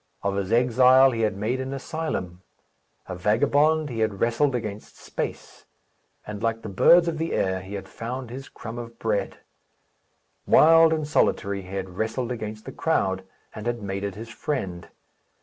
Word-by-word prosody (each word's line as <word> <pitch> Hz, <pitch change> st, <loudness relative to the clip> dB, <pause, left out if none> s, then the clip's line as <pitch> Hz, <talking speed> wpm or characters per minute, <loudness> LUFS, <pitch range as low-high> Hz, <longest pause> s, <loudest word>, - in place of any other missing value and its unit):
Of 100 Hz, 0 st, 0 dB
his 100 Hz, 0 st, -2 dB
exile 125 Hz, +2 st, +5 dB
he 115 Hz, -2 st, -2 dB
had 105 Hz, -3 st, 0 dB
made 115 Hz, +6 st, -1 dB
an 130 Hz, +1 st, -4 dB
asylum. 135 Hz, -, -4 dB, 0.7 s
A 95 Hz, -, -5 dB
vagabond, 145 Hz, -, +2 dB
he 115 Hz, -, -4 dB
had 110 Hz, -3 st, 0 dB
wrestled 120 Hz, +4 st, +2 dB
against 105 Hz, -3 st, -6 dB
space; -, -, -6 dB, 0.6 s
and, 105 Hz, 0 st, -7 dB
like 115 Hz, 0 st, -1 dB
the 110 Hz, -, -5 dB
birds 170 Hz, -, +5 dB
of 160 Hz, -2 st, -2 dB
the 165 Hz, +1 st, -2 dB
air, 95 Hz, -1 st, 0 dB
he 95 Hz, +2 st, -8 dB
had 95 Hz, -1 st, -6 dB
found 120 Hz, +4 st, -6 dB
his 135 Hz, +2 st, -8 dB
crumb 115 Hz, +1 st, -8 dB
of 115 Hz, -1 st, -9 dB
bread. 105 Hz, -3 st, -2 dB, 1.1 s
Wild 165 Hz, +1 st, +7 dB
and 155 Hz, -2 st, -1 dB
solitary, 100 Hz, -8 st, +1 dB
he 95 Hz, +1 st, -9 dB
had 95 Hz, -2 st, -5 dB
wrestled 115 Hz, +3 st, -2 dB
against 110 Hz, -2 st, -6 dB
the 135 Hz, -, -6 dB
crowd, 95 Hz, -12 st, 0 dB, 0.3 s
and 105 Hz, +2 st, -6 dB
had 120 Hz, -2 st, -2 dB
made 100 Hz, 0 st, -4 dB
it 100 Hz, -2 st, -3 dB
his 115 Hz, +2 st, -8 dB
friend. 95 Hz, -, -4 dB
115 Hz, 170 wpm, -25 LUFS, 100-130 Hz, 1.1 s, Wild